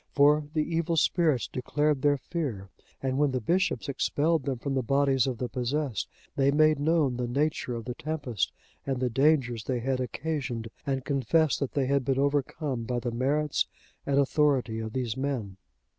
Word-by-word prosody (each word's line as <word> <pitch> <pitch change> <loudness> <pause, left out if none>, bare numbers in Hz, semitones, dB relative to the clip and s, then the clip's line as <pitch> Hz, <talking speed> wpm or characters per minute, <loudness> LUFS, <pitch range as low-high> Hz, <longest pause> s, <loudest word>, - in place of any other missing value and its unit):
For 150 +1 +4
the 155 - +3
evil 165 +1 -1
spirits 155 -5 +2
declared 145 +2 0
their 145 0 +3
fear, 130 - -4 0.3
and 130 0 0
when 145 -1 +4
the 130 -1 -1
bishops 175 - 0
expelled 145 +2 +1
them 135 -2 -1
from 135 +3 -3
the 135 - +1
bodies 135 0 +2
of 130 -3 -2
the 125 - -2
possessed, 125 -1 -2 0.3
they 135 0 +3
made 155 +1 +4
known 145 -4 +2
the 125 -1 -2
nature 140 -1 -1
of 115 -1 -6
the 125 - -3
tempest, 140 - -2 0.3
and 135 -2 -2
the 125 -1 0
dangers 130 -4 +2
they 125 -2 -1
had 130 +2 -1
occasioned, 130 -3 -3 0.2
and 135 -2 -1
confessed 145 +3 +2
that 140 - -2
they 140 -2 +1
had 140 0 +1
been 135 0 0
overcome 140 -1 0
by 125 +1 -2
the 120 0 -2
merits 140 +5 +1 0.4
and 140 -1 0
authority 135 -5 +2
of 110 -1 -5
these 125 -4 -2
men. 130 -8 -3
135 Hz, 180 wpm, -28 LUFS, 125-150 Hz, 0.4 s, For